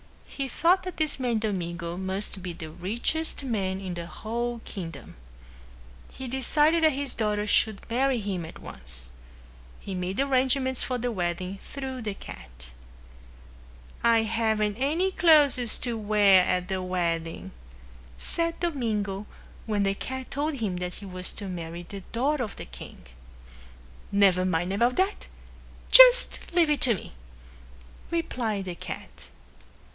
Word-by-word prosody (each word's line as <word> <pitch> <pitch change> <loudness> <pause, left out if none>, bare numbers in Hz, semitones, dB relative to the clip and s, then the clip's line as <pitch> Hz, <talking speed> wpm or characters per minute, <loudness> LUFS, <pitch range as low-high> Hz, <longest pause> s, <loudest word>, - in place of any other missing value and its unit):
He 275 -1 -4
thought 345 +8 +3
that 365 -1 -6
this 310 -3 -1
man 245 -3 +1
Domingo 175 -5 -3
must 190 +1 -3
be 180 -1 -5
the 160 -2 -8
richest 235 - -1
man 195 -7 -1
in 190 -2 -5
the 170 -1 -6
whole 235 +5 -3
kingdom. 165 -7 -8 1.0
He 265 - -7
decided 295 +6 +2
that 315 -2 +5
his 275 -1 -1
daughter 210 -2 0
should 215 -1 +1
marry 255 +2 +1
him 195 -4 -3
at 160 - -9
once. 65 -2 -9 0.7
He 195 - -6
made 185 +3 -3
arrangements 260 -1 +2
for 255 - -1
the 245 0 -2
wedding 180 0 -3
through 265 -2 -6
the 210 -3 -4
cat. - - -11 1.3
"I 230 -1 +5
haven't 220 -2 0
any 320 +9 +1
clothes 290 -10 +4
to 240 -2 -2
wear 205 -3 +5
at 180 0 0
the 190 -1 -2
wedding," 170 -3 -2 0.7
said 335 - -2
Domingo 215 - -2 0.4
when 210 -2 +1
the 195 0 +2
cat 260 +5 -6
told 295 +2 -1
him 210 -8 -2
that 180 0 -4
he 205 - -9
was 185 -1 -3
to 205 - -6
marry 170 -1 -6
the 195 +3 -8
daughter 270 +3 +1
of 210 - -6
the - - -8
king. 65 -1 -12 1.1
"Never 195 -2 +4
mind 180 +1 0
about 240 +5 +2
that. 380 +2 0 0.6
Just - - +9
leave 335 -3 +4
it 295 - +1
to 235 -4 +4
me," - - -9 1.0
replied 230 - -2
the 180 - -4
cat. 170 - -7
215 Hz, 145 wpm, -27 LUFS, 185-265 Hz, 1.3 s, Just